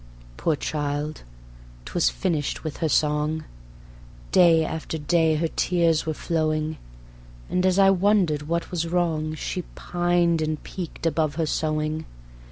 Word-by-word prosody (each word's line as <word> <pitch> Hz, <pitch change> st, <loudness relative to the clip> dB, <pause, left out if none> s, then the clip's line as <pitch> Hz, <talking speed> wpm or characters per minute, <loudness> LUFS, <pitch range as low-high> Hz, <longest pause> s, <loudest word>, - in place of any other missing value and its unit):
Poor 160 Hz, -, +1 dB
child; 145 Hz, +1 st, -3 dB, 0.6 s
'twas -, -, +1 dB
finished 145 Hz, -, -2 dB
with 155 Hz, -2 st, -5 dB
her 160 Hz, -, 0 dB
song: 150 Hz, +1 st, +1 dB, 0.9 s
Day 165 Hz, -3 st, +5 dB
after 160 Hz, 0 st, -4 dB
day 160 Hz, +1 st, +2 dB
her 165 Hz, +2 st, +1 dB
tears 165 Hz, -1 st, +1 dB
were 155 Hz, -, -1 dB
flowing; 155 Hz, -1 st, -1 dB, 0.7 s
And 180 Hz, +1 st, +2 dB
as 185 Hz, 0 st, +2 dB
I 195 Hz, -1 st, +6 dB
wondered 180 Hz, -6 st, +2 dB
what 170 Hz, +1 st, -2 dB
was 170 Hz, -2 st, -1 dB
wrong 160 Hz, -3 st, 0 dB
She 180 Hz, +4 st, -3 dB
pined 175 Hz, -1 st, +1 dB
and 155 Hz, 0 st, -1 dB
peaked 175 Hz, -3 st, -7 dB
above 155 Hz, -2 st, +1 dB
her 165 Hz, 0 st, 0 dB
sewing. 155 Hz, 0 st, -1 dB
160 Hz, 135 wpm, -24 LUFS, 155-170 Hz, 0.9 s, I